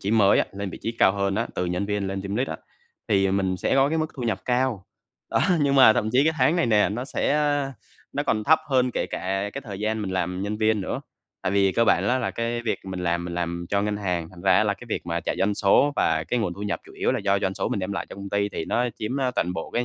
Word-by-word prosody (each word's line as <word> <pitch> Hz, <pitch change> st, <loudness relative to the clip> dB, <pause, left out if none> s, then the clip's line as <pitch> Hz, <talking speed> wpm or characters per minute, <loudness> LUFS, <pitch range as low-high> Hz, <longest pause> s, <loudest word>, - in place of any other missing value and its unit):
trí 100 Hz, -, -2 dB
mới 105 Hz, -3 st, +5 dB
á, -, -, +3 dB
lên 100 Hz, -1 st, -5 dB
vị -, -, -8 dB
trí 115 Hz, -, -2 dB
cao 95 Hz, -, +5 dB
hơn 100 Hz, -1 st, -1 dB
á, 115 Hz, +2 st, 0 dB
từ 90 Hz, -, -1 dB
nhân 90 Hz, +3 st, -2 dB
viên 105 Hz, -1 st, -1 dB
lên 95 Hz, 0 st, -3 dB
team 100 Hz, +1 st, -4 dB
lead 130 Hz, +2 st, 0 dB
á, -, -, -4 dB, 0.5 s
thì 95 Hz, -2 st, +3 dB
mình 95 Hz, -1 st, 0 dB
sẽ -, -, 0 dB
có 135 Hz, +1 st, +4 dB
cái 160 Hz, +2 st, 0 dB
mức 155 Hz, -, +1 dB
thu 130 Hz, -, -5 dB
nhập 115 Hz, -2 st, -1 dB
cao. 125 Hz, -5 st, 0 dB, 0.5 s
Đó -, -, +2 dB, 0.2 s
nhưng 140 Hz, -1 st, +2 dB
mà 130 Hz, -5 st, +8 dB
thậm 110 Hz, -, 0 dB
chí 135 Hz, +3 st, +4 dB
cái 160 Hz, -, +3 dB
tháng 165 Hz, -, +3 dB
này 170 Hz, -, +2 dB
nè, 105 Hz, -3 st, +4 dB
nó 120 Hz, +5 st, -3 dB
sẽ, -, -, -1 dB
a 145 Hz, -2 st, +1 dB, 0.4 s
nó -, -, -1 dB
còn 110 Hz, -, 0 dB
thấp 160 Hz, +5 st, +5 dB
hơn 130 Hz, -2 st, +2 dB
kể -, -, -2 dB
cả 95 Hz, +2 st, -2 dB
cái 140 Hz, -, -5 dB
thời 100 Hz, -2 st, -7 dB
gian 110 Hz, 0 st, -1 dB
mình 95 Hz, -, -3 dB
làm 90 Hz, 0 st, -2 dB
nhân 105 Hz, +1 st, -2 dB
viên 110 Hz, -1 st, +2 dB
nữa. -, -, -3 dB, 0.4 s
Tại 95 Hz, -, -1 dB
vì 100 Hz, -1 st, +3 dB
cơ 115 Hz, +5 st, +3 dB
bản 100 Hz, -1 st, +3 dB
á 130 Hz, -, +2 dB
là 125 Hz, -, -1 dB
cái 120 Hz, +1 st, -2 dB
việc 115 Hz, -, -1 dB
mình 95 Hz, -1 st, -5 dB
làm 85 Hz, -1 st, 0 dB
mình 85 Hz, -1 st, -5 dB
làm 85 Hz, 0 st, -3 dB
cho 100 Hz, 0 st, +1 dB
ngân 105 Hz, 0 st, -1 dB
hàng, 90 Hz, -5 st, -2 dB
thành 90 Hz, -2 st, -13 dB
ra 95 Hz, -1 st, +4 dB
á 110 Hz, -, +4 dB
là 100 Hz, -1 st, +1 dB
cái 120 Hz, -, -13 dB
việc -, -, -3 dB
mà 85 Hz, 0 st, -1 dB
chạy -, -, -3 dB
doanh 100 Hz, +1 st, +1 dB
số 125 Hz, +9 st, +4 dB
và 80 Hz, 0 st, +1 dB
cái 125 Hz, -, +1 dB
nguồn 95 Hz, -6 st, -1 dB
thu 100 Hz, -, -8 dB
nhập 105 Hz, -, -2 dB
chủ -, -, -15 dB
yếu -, -, 0 dB
là -, -, 0 dB
do 100 Hz, 0 st, +1 dB
doanh 95 Hz, 0 st, -1 dB
số -, -, -2 dB
mình 100 Hz, -, -2 dB
đem 95 Hz, +2 st, -3 dB
lại 100 Hz, -, -3 dB
cho -, -, -10 dB
công 100 Hz, 0 st, -7 dB
ty 100 Hz, 0 st, +1 dB
thì 80 Hz, -, -4 dB
nó 125 Hz, +1 st, 0 dB
chiếm, 110 Hz, +5 st, -3 dB
ơ, 130 Hz, -2 st, +1 dB
toàn 90 Hz, -, 0 dB
bộ 80 Hz, -, -5 dB
cái 120 Hz, -, 0 dB
100 Hz, 300 wpm, -25 LUFS, 95-120 Hz, 0.5 s, mà